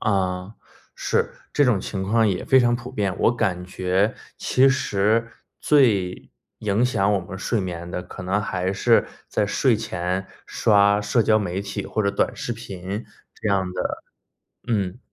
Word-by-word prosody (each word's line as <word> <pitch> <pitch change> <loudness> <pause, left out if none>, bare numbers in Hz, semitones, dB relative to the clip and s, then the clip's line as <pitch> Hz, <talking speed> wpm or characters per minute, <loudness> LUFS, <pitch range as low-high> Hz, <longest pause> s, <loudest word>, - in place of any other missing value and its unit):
啊， 95 -1 -1 0.4
是， - - 0 0.2
这 145 - +4
种 120 -7 +3
情 95 0 -4
况 110 +3 +3
也 90 -2 -2
非 130 - +5
常 120 -1 +3
普 125 +1 -9
遍， 100 -6 -1
我 120 - +3
感 95 -6 -1
觉 95 +3 0 0.2
其 135 +1 +3
实 115 -4 +1 0.3
最 105 -11 +2 0.3
影 105 +3 +1
响 105 -5 +2
我 100 - +2
们 95 +1 -7
睡 115 +3 0
眠 85 -2 -5
的 90 - -3
可 90 - -9
能 95 +3 0
还 95 -2 -2
是 115 +4 +3 0.2
在 - - +1
睡 120 +3 +2
前 95 -3 -3 0.2
刷 100 -1 +3
社 105 +3 +2
交 110 0 +4
媒 95 -2 -2
体 100 0 -5
或 110 - -1
者 100 - +2
短 100 - 0
视 120 - -3
频 100 -2 -6 0.3
这 - - -3
样 95 -2 +1
的， - - -3 0.7
嗯。 100 -2 -1
100 Hz, 180 characters per minute, -23 LUFS, 95-115 Hz, 0.7 s, 非